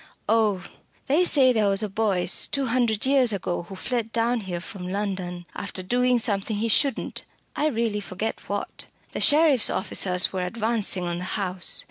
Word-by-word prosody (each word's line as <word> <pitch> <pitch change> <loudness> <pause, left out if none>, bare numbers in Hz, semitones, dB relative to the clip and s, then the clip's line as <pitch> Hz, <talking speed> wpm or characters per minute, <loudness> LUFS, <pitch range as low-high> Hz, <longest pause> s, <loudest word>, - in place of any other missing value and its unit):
"Oh! 215 -5 +1 0.4
they 300 +7 +3
say 270 -7 +4
there 215 -3 +2
was 195 +2 +1
a - - -1
Boyce 195 -3 +2
two 275 -1 -1
hundred 235 -3 +1
years 265 -3 +4
ago 175 -3 -3
who 195 - -8
fled 230 +2 -3
down 235 +1 +1
here 185 -4 -5
from 180 0 -9
London 185 -3 -4
after 195 -2 -4
doing 250 +5 +2
something 215 -2 -1
he 225 +3 -1
shouldn't 275 +5 0 0.3
I 300 - +1
really 230 -6 -1
forget 205 +2 -5
what. 205 0 -4 0.2
The - - -5
sheriff's 295 -6 +4
officers 185 -2 +2
were 185 -1 -2
advancing 215 -1 -1
on 175 0 -3
the - - -5
house. 185 -2 +2
210 Hz, 170 wpm, -24 LUFS, 190-240 Hz, 0.4 s, say